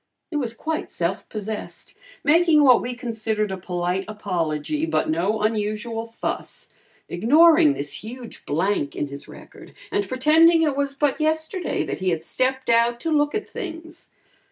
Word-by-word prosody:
He -, -, -5 dB
was 240 Hz, -6 st, -2 dB
quite 315 Hz, +5 st, -3 dB
self 175 Hz, +2 st, -3 dB
possessed, 215 Hz, 0 st, -6 dB, 0.3 s
making 320 Hz, 0 st, +5 dB
what 255 Hz, -3 st, +6 dB
we 245 Hz, 0 st, -4 dB
considered 220 Hz, -4 st, -2 dB
a -, -, -2 dB
polite 180 Hz, +1 st, -2 dB
apology 200 Hz, -, -2 dB
but 320 Hz, -, 0 dB
no 200 Hz, +7 st, 0 dB
unusual 220 Hz, +1 st, -2 dB
fuss, 230 Hz, -, -5 dB, 0.3 s
ignoring 310 Hz, -, +5 dB
this 145 Hz, +6 st, -3 dB
huge 240 Hz, +1 st, -9 dB
blank 165 Hz, -1 st, 0 dB
in 145 Hz, -, -3 dB
his 140 Hz, 0 st, -9 dB
record -, -, -14 dB, 0.2 s
and 405 Hz, 0 st, 0 dB
pretending 320 Hz, +5 st, +5 dB
it 295 Hz, -3 st, +1 dB
was 280 Hz, 0 st, -1 dB
but 290 Hz, +1 st, 0 dB
yesterday 315 Hz, +3 st, -1 dB
that -, -, -4 dB
he 185 Hz, 0 st, 0 dB
had 165 Hz, -2 st, -1 dB
stepped 260 Hz, +7 st, -1 dB
out 235 Hz, 0 st, +3 dB
to 330 Hz, -, -2 dB
"look 295 Hz, +1 st, +2 dB
at 425 Hz, -, -3 dB
things." 330 Hz, -2 st, -8 dB
240 Hz, 155 wpm, -23 LUFS, 205-310 Hz, 0.3 s, what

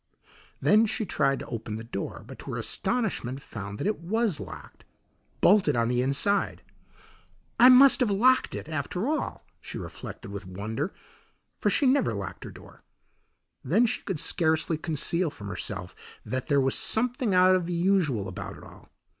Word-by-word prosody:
Then 215 Hz, +2 st, +4 dB
she 220 Hz, +1 st, -2 dB
tried 140 Hz, -5 st, +1 dB
to -, -, -6 dB
open 110 Hz, -2 st, -5 dB
the 110 Hz, -, -6 dB
door, 105 Hz, -4 st, -6 dB
but -, -, -11 dB
to -, -, -7 dB
her -, -, -3 dB
astonishment 185 Hz, -, -2 dB
found 100 Hz, -5 st, -8 dB
that -, -, -4 dB
it 210 Hz, 0 st, 0 dB
was 205 Hz, 0 st, 0 dB
locked -, -, -10 dB, 0.6 s
bolted 185 Hz, -7 st, +4 dB
on 115 Hz, 0 st, +1 dB
the 125 Hz, 0 st, +1 dB
inside. 140 Hz, +10 st, 0 dB, 1.0 s
"I 250 Hz, -, +9 dB
must 260 Hz, +2 st, +8 dB
have 250 Hz, -4 st, +2 dB
locked 250 Hz, +6 st, +3 dB
it, -, -, -6 dB
after 160 Hz, -, -3 dB
all," 310 Hz, +1 st, -3 dB
she -, -, -8 dB
reflected 100 Hz, -, -8 dB
with 100 Hz, -1 st, -7 dB
wonder, 110 Hz, -, -4 dB, 0.7 s
for -, -, +1 dB
she 285 Hz, -, +2 dB
never 260 Hz, -, +2 dB
locked 100 Hz, -2 st, -6 dB
her -, -, -7 dB
door. -, -, -15 dB, 0.8 s
Then 195 Hz, -, +3 dB
she 230 Hz, -, -1 dB
could 190 Hz, -6 st, -3 dB
scarcely 160 Hz, 0 st, +1 dB
conceal 165 Hz, +2 st, -1 dB
from 105 Hz, -7 st, -9 dB
herself 90 Hz, -, -5 dB, 0.3 s
that 130 Hz, 0 st, -3 dB
there 140 Hz, -1 st, +3 dB
was 135 Hz, -1 st, +1 dB
something 240 Hz, -2 st, +2 dB
out 185 Hz, +1 st, +6 dB
of 180 Hz, -2 st, -1 dB
the 175 Hz, -, -3 dB
usual 170 Hz, -, +1 dB
about 95 Hz, -, -7 dB
it -, -, -14 dB
all. -, -, -15 dB
165 Hz, 170 wpm, -27 LUFS, -, 1.0 s, I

